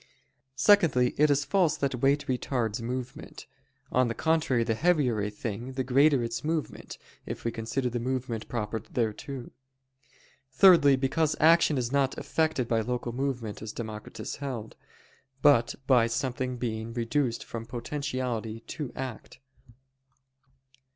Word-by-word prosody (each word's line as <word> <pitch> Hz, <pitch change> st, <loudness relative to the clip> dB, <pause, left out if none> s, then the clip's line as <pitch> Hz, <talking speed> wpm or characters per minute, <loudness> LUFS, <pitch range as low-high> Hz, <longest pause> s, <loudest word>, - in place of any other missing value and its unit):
Secondly, 135 Hz, -6 st, +4 dB
it 150 Hz, 0 st, +5 dB
is 140 Hz, -1 st, +2 dB
false 185 Hz, -6 st, +2 dB
that 140 Hz, -1 st, -1 dB
weight 140 Hz, +2 st, +2 dB
retards 120 Hz, -3 st, -1 dB
movement; 125 Hz, +2 st, -6 dB, 0.5 s
on 130 Hz, 0 st, +3 dB
the 115 Hz, -, -3 dB
contrary, 160 Hz, -7 st, +1 dB
the 115 Hz, -, 0 dB
heavier 135 Hz, -6 st, +2 dB
a 105 Hz, -, -1 dB
thing, 115 Hz, +4 st, -5 dB
the 130 Hz, 0 st, -1 dB
greater 135 Hz, +1 st, +4 dB
its 115 Hz, +4 st, -4 dB
movement, 155 Hz, 0 st, -3 dB, 0.3 s
if -, -, -6 dB
we 115 Hz, -, +1 dB
consider 120 Hz, +4 st, -2 dB
the 120 Hz, 0 st, -2 dB
movement 125 Hz, -2 st, -3 dB
proper 110 Hz, -1 st, -2 dB
thereto. 120 Hz, +3 st, -4 dB, 1.0 s
Thirdly, 145 Hz, -3 st, +7 dB
because 145 Hz, +4 st, 0 dB
action 160 Hz, -2 st, +5 dB
is 120 Hz, -1 st, -1 dB
not 140 Hz, -1 st, +1 dB
effected 155 Hz, -6 st, 0 dB
by 115 Hz, -1 st, +1 dB
local 120 Hz, +1 st, -3 dB
movement, 125 Hz, -4 st, -3 dB
as 110 Hz, -1 st, -5 dB
Democritus 110 Hz, -2 st, -6 dB
held: 125 Hz, -6 st, -6 dB, 0.7 s
but 140 Hz, -6 st, +5 dB
by 125 Hz, -4 st, +4 dB
something 125 Hz, +1 st, -2 dB
being 115 Hz, -1 st, -4 dB
reduced 120 Hz, +1 st, -1 dB
from 115 Hz, -1 st, -7 dB
potentiality 125 Hz, -3 st, -3 dB
to 140 Hz, +1 st, -6 dB
act. 130 Hz, -4 st, -7 dB
125 Hz, 135 wpm, -28 LUFS, 115-140 Hz, 1.0 s, Thirdly